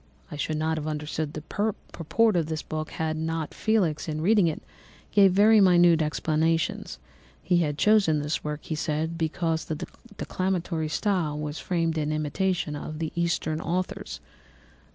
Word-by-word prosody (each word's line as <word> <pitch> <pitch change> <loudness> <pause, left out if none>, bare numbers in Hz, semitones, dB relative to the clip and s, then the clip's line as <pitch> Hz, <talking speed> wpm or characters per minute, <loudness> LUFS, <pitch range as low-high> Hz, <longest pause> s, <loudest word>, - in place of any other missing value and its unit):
I - - -5
should 155 +1 -2
not 160 +1 0
have 155 0 -4
understood 150 0 -3
the 155 - -6
purport 210 +1 0
of 165 -3 +1
this 160 -2 -3
book 155 0 -4
had 160 -1 -2
not 160 0 -3
Felix, 185 -10 0
in 155 0 -2
reading 195 +2 +4
it, 160 - -3 0.5
given 195 -2 +6
very 210 +3 +6
minute 175 -3 +5
explanations. 160 +1 0 0.5
He 175 +2 +2
had 150 -4 0
chosen 205 -5 +4
this 150 +1 -2
work, 150 0 -4
he - - -4
said, 155 +1 -2
because 165 0 -1
the 155 - -4 0.3
declamatory 175 -4 -2
style 165 -4 0
was 150 0 -4
framed 165 -3 -1
in 150 0 -1
imitation 155 +1 -1
of 155 +1 -6
the 160 0 -3
Eastern 165 -2 -1
authors. 180 +2 -3
160 Hz, 155 wpm, -26 LUFS, 155-180 Hz, 0.5 s, given